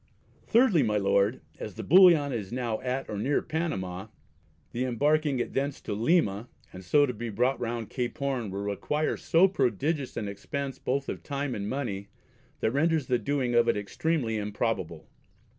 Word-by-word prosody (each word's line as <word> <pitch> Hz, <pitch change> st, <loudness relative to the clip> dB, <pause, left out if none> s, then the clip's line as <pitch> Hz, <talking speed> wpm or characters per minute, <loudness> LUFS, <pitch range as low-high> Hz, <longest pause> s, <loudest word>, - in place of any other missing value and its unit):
Thirdly, 225 Hz, -, +4 dB
my 105 Hz, -4 st, +1 dB
Lord, 100 Hz, +3 st, +2 dB, 0.2 s
as 105 Hz, -, -6 dB
the 110 Hz, -, -6 dB
Bullion 165 Hz, -, +6 dB
is 105 Hz, -5 st, -4 dB
now 120 Hz, -3 st, -2 dB
at 130 Hz, +1 st, -2 dB
or 105 Hz, -, -4 dB
near 140 Hz, +7 st, +1 dB
Panama, 105 Hz, -, -3 dB, 0.6 s
the 120 Hz, -, -2 dB
embarking 145 Hz, +3 st, +1 dB
it 120 Hz, -, -3 dB
thence 140 Hz, +1 st, -1 dB
to -, -, -6 dB
Lyma, 115 Hz, -, +1 dB, 0.3 s
and 95 Hz, 0 st, -9 dB
so 145 Hz, +11 st, +4 dB
to 125 Hz, -, -3 dB
be 115 Hz, +1 st, -5 dB
brought 125 Hz, +5 st, +1 dB
round 115 Hz, -2 st, -4 dB
Cape 125 Hz, 0 st, -3 dB
Horn, 135 Hz, -7 st, -2 dB
will 100 Hz, +1 st, -4 dB
require 150 Hz, +10 st, -1 dB
so 170 Hz, +4 st, +4 dB
prodigious 140 Hz, -, -1 dB
an 105 Hz, -, -2 dB
expence 135 Hz, +7 st, -5 dB
both 135 Hz, +2 st, -1 dB
of -, -, -4 dB
time 140 Hz, -2 st, -3 dB
and 100 Hz, -1 st, -4 dB
money, 105 Hz, -7 st, -3 dB, 0.5 s
that 110 Hz, -, +1 dB
renders 155 Hz, +2 st, +1 dB
the 125 Hz, -1 st, +1 dB
doing 135 Hz, -3 st, -1 dB
of 120 Hz, 0 st, +4 dB
it 115 Hz, -, +2 dB
extremely 115 Hz, +3 st, -1 dB
improbable. 105 Hz, -6 st, -3 dB
125 Hz, 175 wpm, -28 LUFS, 105-145 Hz, 0.6 s, Bullion